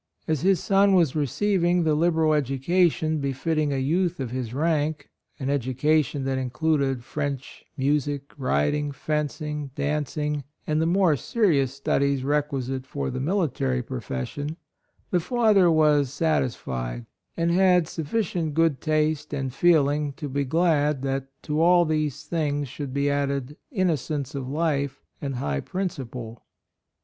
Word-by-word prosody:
As 155 -4 0
his 190 +1 +3
son 195 0 +4
was 165 -7 +3
receiving 175 - +1
the 155 -1 +2
liberal 160 0 +2
education 155 +3 +1
befitting 145 +2 -1
a 140 - 0
youth 170 +6 0
of 130 -3 -3
his 125 -3 -3
rank 155 +2 -1
— - - -42
an 135 - -3
education 140 +2 +1
that 135 0 -1
included 135 -1 0
French, 140 -1 -4
music, 145 0 -1
riding, 145 - 0
fencing, 150 0 -3
dancing, 150 0 -1 0.2
and 155 0 +1
the 165 - +2
more 180 -3 +3
serious 140 - +1
studies 140 -1 +1
requisite 135 -2 -1
for 70 -1 -3
the - - -4
military 135 - 0
profession, 145 - -5 0.3
— - - -42
the 180 - +3
father 210 -2 +3
was 150 -4 +3
sat 155 +2 +1
isfied, - - -4 0.3
and 170 0 +1
had 180 -2 +4
sufficient 165 -2 -2
good 160 -5 +2
taste 155 -1 0
and 135 -2 -3
feeling 150 -2 +3
to 145 - -6
be 140 +1 -1
glad 150 -2 +1
that 135 0 -2 0.2
to 150 +1 -1
all 175 +1 +5
these 155 -3 -1
things 145 -4 -1
should 140 +2 -6
be 140 +1 0
added 140 -1 -1
innocence 155 - -1
of 135 -2 -4
life 140 -2 -1 0.2
and 140 -2 -3
high 70 - -1
principle. 125 - -5
150 Hz, 140 wpm, -25 LUFS, 135-160 Hz, 0.3 s, all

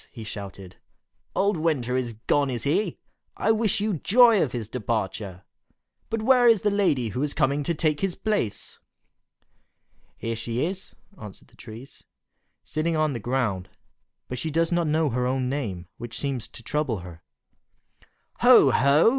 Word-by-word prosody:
he 115 - -9
shouted, 100 -3 -8 0.6
"Old 200 -1 +2
Winter 145 -7 0
is 125 -2 -1
gone, 145 -1 +2
is 120 -2 -3
he? 165 +6 0 0.4
I 220 - +2
wish 220 -3 +1
you 205 -3 -1
joy 230 - +5
of 130 - 0
his 115 -4 -4
departure! 105 -5 -3 0.7
But 225 -1 -2
where 250 0 +5
is 225 -5 +5
the 210 - +2
lady 165 - +1
who 110 - -4
was 145 +1 -1
coming 140 +2 +1
to 165 +4 -1
take 155 -1 +1
his 195 -3 -1
place?" 210 - -2 1.4
"She 115 - -3
is 115 0 -4 0.4
here," - - -28 0.2
answered 105 -3 -10
the - - -24
trees, 120 +3 -12 0.6
"sitting 155 +1 -1
on 155 -2 +1
the 120 - -4
ground; 110 -6 -1 0.6
but 125 - -5
she 160 - -2
does 165 +2 +1
not 170 -2 +1
know 155 -1 +1
her 125 +1 0
own 130 0 -1
name, 105 -11 -4
which 120 0 -6
seems 135 -5 -3
to 115 - -12
trouble 130 -6 -1
her." 85 -2 -11 1.2
"Ho! - - +7
ho!" 140 +8 +5
135 Hz, 165 wpm, -25 LUFS, 115-165 Hz, 1.4 s, Ho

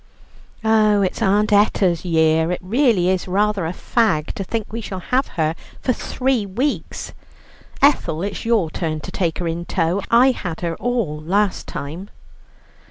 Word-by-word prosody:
"Oh, 215 -2 +4
it's 185 - -2
Aunt 205 +2 +2
Etta's 195 -4 +3
year; 160 -1 +2
it 180 - -2
really 220 -3 +2
is 185 0 0
rather 200 -1 +1
a - - -2
fag 185 -5 0
to 195 - -4
think 215 +2 -4
we 230 - -3
shall 195 -3 -6
have 255 +8 0
her 160 -1 +1 0.3
for 255 - 0
three 255 -1 -1
weeks. 235 +9 -3 0.7
Ethel, 190 - +3
it's 200 0 -4
your 220 -9 +1
turn 155 -2 -3
to - - -7
take 170 -4 -1
her 175 - -2
in 165 +1 -3
tow; 175 +2 0
I 250 +3 +6
had 175 -9 -5
her 170 -1 -2
all 225 -12 -2
last 195 +5 0
time." 165 +8 -6
195 Hz, 165 wpm, -20 LUFS, 170-220 Hz, 0.7 s, I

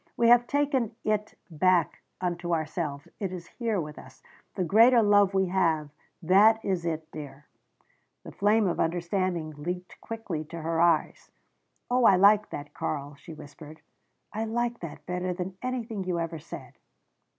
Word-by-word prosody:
We 235 -1 +4
have 240 0 +6
taken 275 -6 0
it 215 0 -1 0.2
back 175 +1 +2 0.2
unto 175 -1 -1
ourselves. 155 -2 -4
It 195 -3 -3
is 180 -2 -7
here 225 0 -2
with 150 -2 -6
us. 130 0 -16 0.3
The 185 - 0
greater 230 +6 +6
love 205 -1 +4
we 190 0 +3
have 160 -5 +1 0.3
that 205 +6 +5
is 180 -3 -1
it, 160 -1 -4
dear." 145 -1 -9 0.8
The - - -9
flame 210 +2 +2
of 175 - -1
understanding 170 -1 -1
leaped 180 +5 -6
quickly 215 -9 -5
to 165 +2 -8
her 165 0 0
eyes. 170 -2 +1 0.6
"Oh, 250 -1 +3
I 195 - +7
like 205 +3 +5
that 145 0 -7
Karl," 145 -1 -4
she 155 +3 -12
whispered. 150 +1 -12 0.5
"I 220 +2 -2
like 235 +1 -2
that 170 -3 -9
better 180 0 -2
than 180 +1 -5
anything 235 -5 -3
you 180 -2 -1
ever 165 -1 -4
said." - - -10
180 Hz, 160 wpm, -27 LUFS, 160-210 Hz, 0.8 s, I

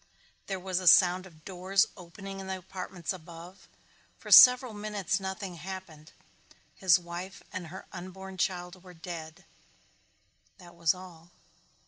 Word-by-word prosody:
There 195 -2 -3
was 185 0 -2
a 185 - -4
sound 180 +3 +6
of 155 -4 -20
doors 190 +2 +1
opening 195 +2 -9
in 190 - -7
the 190 0 -3
apartments 185 -1 -6
above. 175 +1 -12 0.5
For - - -10
several 250 -2 +9
minutes 205 -2 -2
nothing 190 -1 -6
happened. 165 -3 -9 0.6
His 185 -2 +4
wife 175 +2 -8
and 180 -2 -5
her 185 +4 -10
unborn 185 +1 -9
child 180 0 -2
were 180 -1 -14
dead 165 -2 -9 1.1
that 175 -2 -15
was 170 0 +2
all. 175 -2 -13
185 Hz, 135 wpm, -29 LUFS, 175-190 Hz, 1.1 s, several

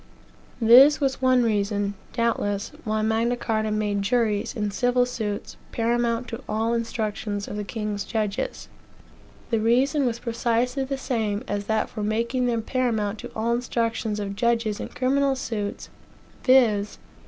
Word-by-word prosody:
This 255 +6 +8
was 270 -3 0
one 255 -1 +4
reason, 205 -2 0 0.2
doubtless, 220 -4 -1
why 215 0 0
Magna 225 +2 +1
Carta 220 -2 -1
made 210 -1 0
juries, 215 0 0
in 210 -3 -1
civil 245 +3 +2
suits, 215 -4 -4
paramount 235 +1 0
to 230 +2 -6
all 225 +2 0
instructions 215 -3 -2
of - - -6
the 210 - -3
king's 210 -1 -3
judges. 215 - -3 0.8
The 225 - +2
reason 255 +5 +2
was 235 -1 -1
precisely 235 +3 0
the 270 +1 -3
same 225 -5 -2
as 205 0 -2
that 220 0 0
for 215 - -7
making 235 +4 0
them 230 -2 0
paramount 220 -5 -1
to - - -8
all 230 +2 0
instructions 230 -3 -1
of 200 -1 -4
judges 230 -1 0
in - - -4
criminal 275 +1 +1
suits, 215 -6 -4 0.5
viz. 220 -6 +4
230 Hz, 145 wpm, -25 LUFS, 210-245 Hz, 0.8 s, This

